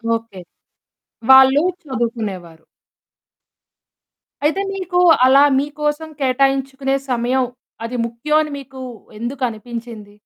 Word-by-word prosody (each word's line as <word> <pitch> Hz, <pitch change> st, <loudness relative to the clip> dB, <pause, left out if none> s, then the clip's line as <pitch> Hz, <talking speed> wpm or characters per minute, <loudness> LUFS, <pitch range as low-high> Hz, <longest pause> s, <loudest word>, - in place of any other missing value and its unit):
Okay. 225 Hz, -4 st, -8 dB, 0.9 s
వాళ్ళు 265 Hz, +2 st, +7 dB, 0.2 s
చదువుకునేవారు. 215 Hz, -, -5 dB, 1.8 s
అయితే 320 Hz, +6 st, +1 dB
మీకు 370 Hz, -2 st, -2 dB, 0.3 s
అలా 270 Hz, +2 st, +6 dB, 0.2 s
మీకోసం 295 Hz, +2 st, -3 dB
కేటాయించుకునే 270 Hz, +1 st, 0 dB
సమయం 250 Hz, +1 st, +1 dB, 0.4 s
అది 240 Hz, +2 st, -5 dB
ముఖ్యమని 300 Hz, +6 st, -1 dB
మీకు 270 Hz, -1 st, -11 dB, 0.4 s
ఎందుకు 255 Hz, +3 st, -4 dB
అనిపించింది? 225 Hz, -2 st, -9 dB
265 Hz, 80 wpm, -19 LUFS, 230-280 Hz, 1.8 s, వాళ్ళు